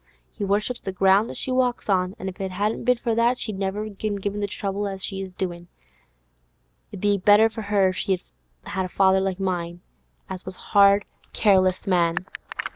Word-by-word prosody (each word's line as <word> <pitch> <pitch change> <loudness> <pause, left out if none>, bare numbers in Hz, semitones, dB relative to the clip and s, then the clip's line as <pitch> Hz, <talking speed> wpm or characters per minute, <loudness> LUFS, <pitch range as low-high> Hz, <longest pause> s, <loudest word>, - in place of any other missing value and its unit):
He 210 - -6
worships 210 +5 0
the 190 - -4
ground 195 +3 +3
as - - -6
she 260 - -2
walks 255 -1 0
on, 185 -1 +1
an' 190 - -6
if 190 +1 -6
it 190 - -2
hadn't 205 +5 -2
been 250 0 +4
for 230 -1 -1
that, 235 +2 +2
she'd 215 -6 -3
never 195 +2 -2
have 210 -2 -10
given 205 -2 -3
him 205 0 -2
the 205 - -1
trouble 200 +1 -3
as 195 -1 -5
she 195 -1 -4
is 190 -1 -6
doin'. 175 -2 -4 1.2
It - - -7
'ud 185 - -4
a 205 -1 +3
been - - -8
better 205 +4 +6
for 220 - -6
her 200 -2 +2
if 185 - -5
she'd 190 -3 -1 0.4
had 190 -1 -3
a - - -6
father 190 0 +3
like 190 -1 -2
mine, 175 -2 -3 0.5
as 185 -1 -7
was 185 0 -4
a - - -14
hard, 200 0 +6 0.3
careless 185 -3 +3
man. 170 -3 +2
195 Hz, 215 wpm, -24 LUFS, 185-210 Hz, 1.2 s, better